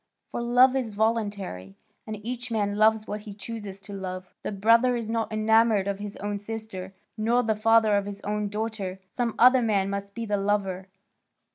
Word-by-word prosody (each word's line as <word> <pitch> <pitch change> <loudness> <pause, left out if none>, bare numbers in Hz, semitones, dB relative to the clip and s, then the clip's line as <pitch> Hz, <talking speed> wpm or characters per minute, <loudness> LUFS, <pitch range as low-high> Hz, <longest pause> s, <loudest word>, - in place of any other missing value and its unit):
For - - -4
love 250 +2 +5
is 235 -6 -2
voluntary, 205 - -1 0.3
and 215 -1 -4
each 245 0 -4
man 205 -3 0
loves 215 +1 +3
what 210 0 -4
he 210 -2 -9
chooses 205 -2 -7
to 205 - -10
love. 185 -1 -6
The - - -4
brother 230 +5 +4
is 230 -2 -3
not 225 -1 -1
enamoured 215 -1 +3
of 200 0 -2
his 205 0 -6
own 205 0 -3
sister, 205 -3 -6 0.2
nor 235 +3 +2
the 220 -1 +1
father 220 0 +4
of 200 0 0
his 200 -1 -6
own 210 0 -2
daughter; 210 -3 -4
some 235 +1 -2
other 255 +2 +6
man 200 -4 +1
must 200 0 -5
be 230 - -3
the 205 -1 0
lover. 195 -2 -1
215 Hz, 185 wpm, -26 LUFS, 200-225 Hz, 0.3 s, other